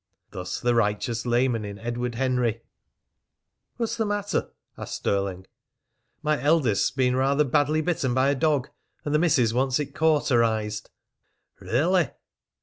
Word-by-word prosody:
Thus 90 -1 -5
the 120 0 +1
righteous 115 +1 0
layman 120 -1 +1
in 100 -1 -6
Edward 120 +2 -3
Henry! 125 -3 0 1.1
"What's 230 0 -2
the 225 - 0
matter?" 205 0 -1 0.3
asked - - -6
Stirling. 100 -2 -2 0.8
"My 150 -1 +1
eldest's 145 -9 +2
been 125 -2 +1
rather 140 +3 +2
badly 145 +3 +1
bitten 150 -7 -1
by 130 +1 +3
a 140 - +2
dog, 145 -2 +1 0.4
and 145 - -1
the 150 - +4
missis 145 -10 +3
wants 130 +2 +1
it 140 -1 -4
cauterized." 115 -9 +1 0.7
"Really?" 170 +7 +1
130 Hz, 135 wpm, -25 LUFS, 115-150 Hz, 1.1 s, the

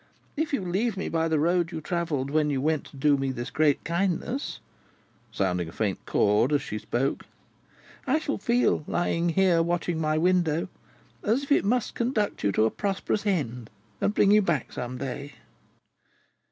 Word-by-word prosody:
If 310 +1 -1
you 275 - 0
leave 195 +4 -1
me 190 - -3
by 165 0 +1
the 160 -1 +1
road 170 +2 +1
you 160 - -4
travelled 155 -5 -2
when 155 0 +2
you 140 -2 0
went 155 +1 0
to 140 - -13
do 145 +1 +3
me 135 -1 -1
this 120 -2 -5
great 150 -2 +2
kindness," 195 - -2 0.7
sounding 90 -5 -1
a - - -10
faint 100 +1 -2
chord 105 +6 +3
as 145 -2 +2
she 105 - -4
spoke, 130 +6 -2 0.8
"I 270 +4 +3
shall 295 -5 -2
feel, 235 -5 +2
lying 175 0 0
here 175 -1 +3
watching 170 0 -1
at - - -2
my 155 0 +1
window, 170 -1 +2 0.5
as 235 +7 +1
if 280 - -8
it 285 - +4
must 240 +3 +1
conduct 235 -3 -1
you 100 - +2
to 110 - +3
a 110 - +1
prosperous 205 +1 -2
end, 125 - -1 0.3
and 210 - +1
bring 200 - +4
you 210 +1 +6
back 170 -7 -1
some 125 +1 -5
day." 140 +2 -5
165 Hz, 180 wpm, -26 LUFS, 140-195 Hz, 0.8 s, you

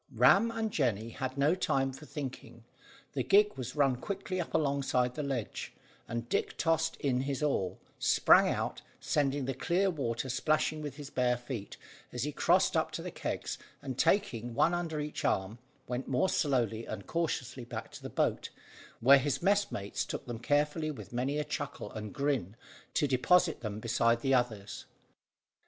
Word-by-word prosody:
Ram 195 - +6
and 225 -1 -2
Jemmy 115 - 0
had 130 +3 -4
no 145 +4 +4
time 135 -7 0
for 150 +3 -11
thinking; 130 -5 -7 0.5
the - - 0
gig 210 +1 +4
was 130 0 -6
run 135 -4 +3
quickly 185 +4 -3
up 170 - -5
alongside 140 -4 +1
of - - -22
the 150 - -3
ledge, 135 -6 -3 0.3
and 115 +1 -4
Dick - - -1
tossed 160 0 +1
in 130 -4 +1
his 140 +1 -2
oar, 95 -11 0 0.2
sprang - - +5
out, - - -2 0.2
sending 140 -2 0
the 135 - -1
clear 180 +8 +1
water 130 -6 -2
splashing 155 +4 +1
with 145 -3 -5
his 145 -1 -9
bare 125 -1 +2
feet, 120 -4 -6 0.3
as 125 -1 -3
he 150 - -1
crossed - - +3
up - - +2
to - - -4
the - - -5
kegs, - - -4 0.2
and, 135 -2 -5
taking 120 - +1
one 170 - +3
under 170 -3 -2
each 150 0 -4
arm, 95 +4 0 0.3
went 125 +1 -3
more 135 +8 +2
slowly 120 -6 +1
and - - -6
cautiously 135 -7 -2
back 115 -1 -7
to - - -10
the - - -6
boat, - - 0 0.5
where 135 +4 +8
his 145 +4 -1
messmates 195 - +1
took - - -5
them 120 -2 -5
carefully, 150 +3 +1
with 145 -4 -8
many 130 +4 0
a 150 - 0
chuckle 150 -7 -5
and 110 -1 -6
grin, 135 -9 -1 0.4
to - - +3
deposit 165 +6 +3
them 105 -2 -4
beside 115 +1 +2
the 135 +1 +2
others. 110 -5 -1
135 Hz, 175 wpm, -31 LUFS, 120-155 Hz, 0.5 s, where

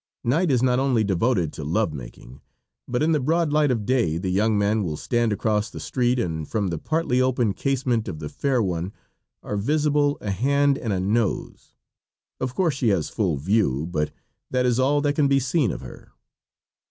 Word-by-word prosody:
Night 155 +9 +1
is 125 -3 +2
not 125 -1 +3
only 130 -5 +2
devoted 100 - +1
to 75 - -7
love 85 +3 0
making, 65 -1 -10 0.5
but 125 +4 0
in 160 - +2
the 155 - +3
broad 160 +3 +1
light 150 -1 +3
of 115 -5 -1
day 115 -11 +1
the 90 +1 -2
young 105 +3 +2
man 105 +2 +1
will 80 -5 -3
stand 120 +5 0
across 105 +1 0
the - - -9
street 125 -1 0
and 80 -9 -2
from 105 -4 -1
the 85 -2 -3
partly 155 - 0
opened 125 -5 +1
casement 125 -5 0
of 90 -5 -5
the 75 -1 -6
fair 130 - 0
one 90 0 -3 0.5
are 105 - -3
visible 145 +4 +1
a 105 - -3
hand 140 +7 +2
and 115 -5 -3
a 95 - 0
nose 105 +3 -2 0.6
of 130 -1 -3
course 175 -5 +2
she 130 -2 -1
has 95 -6 0
full 90 -9 -1
view, 80 - +1
but 75 -2 0 0.4
that 125 0 +1
is 125 0 +2
all 145 +3 +3
that 145 0 +1
can 145 -1 +2
be 140 0 +3
seen 130 - +1
of - - -6
her. - - -12
115 Hz, 200 wpm, -24 LUFS, 95-135 Hz, 0.6 s, not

